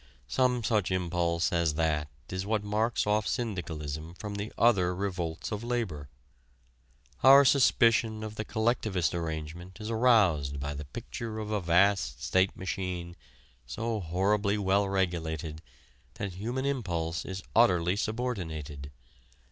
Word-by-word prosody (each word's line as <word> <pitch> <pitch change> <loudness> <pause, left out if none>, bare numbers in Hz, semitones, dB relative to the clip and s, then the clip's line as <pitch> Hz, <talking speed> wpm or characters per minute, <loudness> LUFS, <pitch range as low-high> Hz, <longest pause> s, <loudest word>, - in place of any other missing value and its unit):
Some 125 - +1
such 105 -2 +1
impulse 85 -2 0
as 85 -3 +1
that 75 -2 0 0.2
is 95 0 -3
what 105 +1 -1
marks 110 +3 0
off 105 +1 +1
syndicalism 80 - -4
from 105 +2 -6
the 100 +1 -4
other 95 -6 +3
revolts 90 -4 -3
of 105 +1 -3
labor. 110 - -3 1.1
Our 135 +2 +9
suspicion 115 -4 +4
of 110 -1 -5
the 110 - -4
collectivist 110 -5 0
arrangement 85 +2 -5
is 110 +1 -5
aroused 100 - +3
by 70 +1 -3
the 75 +1 -6
picture 110 - -6
of 110 -1 -4
a 105 -2 0
vast 85 -6 +2
state 95 +1 +2
machine 90 -2 -4 0.5
so 115 - -2
horribly 100 +4 +1
well 100 0 +2
regulated 80 -5 -2 0.5
that 100 -2 -4
human 120 +8 -3
impulse 85 -12 -2
is 95 0 -6
utterly 90 -6 +4
subordinated. 85 - -3
95 Hz, 130 wpm, -29 LUFS, 85-110 Hz, 1.1 s, Our